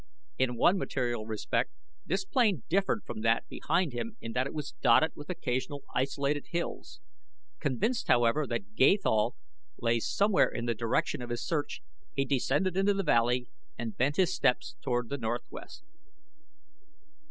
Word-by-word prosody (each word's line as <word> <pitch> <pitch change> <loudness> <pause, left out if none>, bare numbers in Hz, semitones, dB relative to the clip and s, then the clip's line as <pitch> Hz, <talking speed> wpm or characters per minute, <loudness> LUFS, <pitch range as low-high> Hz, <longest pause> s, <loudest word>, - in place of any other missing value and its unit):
In 130 -2 +2
one 185 +10 +4
material 120 - -2
respect 110 -1 -1 0.4
this - - 0
plain 235 - +2
differed 195 +4 +1
from 110 - -6
that 115 +1 +2
behind 170 -6 0
him 220 - -4
in 115 - -6
that 130 +2 +1
it - - -8
was 150 -2 -4
dotted 130 +7 +5
with 145 - -10
occasional 140 -3 -3
isolated 140 +2 0
hills. 170 0 -4 0.6
Convinced, 220 - 0
however, 120 +5 +3
that 105 -4 -4
Gathol 130 - +3 0.4
lay 115 0 +2
somewhere 200 - +3
in 120 - -4
the 120 - +1
direction 115 +2 -1
of 120 - -6
his 120 0 -3
search 155 -4 -2 0.3
he 135 - +1
descended 145 +7 +1
into 195 +1 +3
the 195 - 0
valley 125 -4 +2 0.3
and 115 -2 -4
bent 140 +3 +1
his 185 0 +3
steps 125 - +1
toward 120 -1 -1
the 140 0 -3
northwest. 120 +1 -5
130 Hz, 155 wpm, -30 LUFS, 120-170 Hz, 0.6 s, dotted